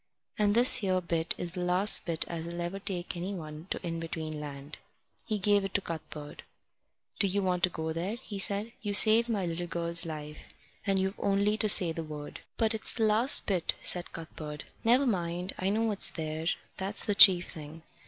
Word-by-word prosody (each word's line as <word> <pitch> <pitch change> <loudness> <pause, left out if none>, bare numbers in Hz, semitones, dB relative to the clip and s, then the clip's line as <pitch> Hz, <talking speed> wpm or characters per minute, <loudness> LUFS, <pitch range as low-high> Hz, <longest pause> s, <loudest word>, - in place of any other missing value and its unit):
And 205 0 +1
this 245 +2 +8
here 190 -6 -1
bit 170 -2 -1
is 175 - -6
the 180 - -8
last 180 +3 +1
bit 165 -2 -3
as'll 170 +1 -7
ever 175 +3 -5
take 185 -2 -6
anyone 170 -3 -7
to - - -3
In 165 -1 -4
between 160 -2 -6
Land." 145 0 -10 0.5
He 215 - -2
gave 205 0 +1
it 195 - -7
to 205 - +1
Cuthbert. 155 -3 -9 0.8
"Do 200 - +1
you 200 +1 -1
want 180 -1 -1
to - - -6
go 160 -1 -5
there?" 180 +7 -4
he 225 -5 -9
said. 205 +3 +2
"You've 205 -2 +7
saved 225 +2 +5
my 205 -5 -2
little 175 +1 -5
girl's 170 0 +3
life, 150 -2 -9 0.4
and 195 -1 +1
you've 190 +1 -2
only 200 +1 0
to 215 -1 +2
say 180 -4 +7
the 165 0 -6
word." 150 -1 -9 0.2
"But 225 -1 +2
it's 220 - -1
the 225 - -2
last 220 +5 +3
bit," 185 -5 -2
said 180 -1 +2
Cuthbert. 155 -2 -9 0.2
"Never 245 +5 +3
mind. 180 -4 -3
I 185 - -1
know 215 +3 -1
what's 210 -3 +1
there. 160 0 -6 0.3
That's 195 +2 0
the 210 - -1
chief 185 -3 +7
thing." 155 +1 -11
180 Hz, 195 wpm, -28 LUFS, 165-205 Hz, 0.8 s, this